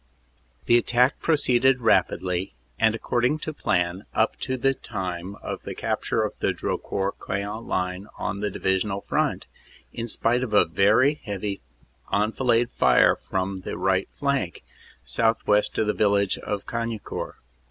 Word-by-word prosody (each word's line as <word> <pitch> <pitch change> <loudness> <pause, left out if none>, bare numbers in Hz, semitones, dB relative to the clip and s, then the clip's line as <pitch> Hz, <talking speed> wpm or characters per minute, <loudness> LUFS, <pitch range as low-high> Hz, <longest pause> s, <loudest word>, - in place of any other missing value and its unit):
"The 120 - +5
attack 125 +2 +2
proceeded 130 -4 +3
rapidly, 95 -4 +1 0.2
and 110 0 +3
according 120 +5 0
to 155 - -3
plan 90 -6 -1
up 110 - +2
to 130 0 -2
the 135 +2 +2
time 95 -5 -5
of - - -4
the - - -7
capture - - -1
of - - -2
the - - +1
Drocourt 100 0 -3
Queant 100 +3 -4
line 90 +2 -2
on 100 -1 -3
the 105 0 -1
Divisional 95 +1 -1
front, - - -1 0.5
in 115 0 -4
spite 120 +2 +1
of 115 -5 -2
a - - +6
very 110 - +3
heavy 100 -2 -4 0.5
enfilade 115 +3 +2
fire - - +4
from 95 0 -3
the - - -5
right 95 +1 +1
flank, 140 -10 -2 0.4
southwest 110 -2 +1
of 110 - +2
the 105 - +1
village 100 -2 +2
of 100 -1 -4
Cagnicourt. 115 -2 -4
105 Hz, 140 wpm, -25 LUFS, 95-120 Hz, 0.5 s, a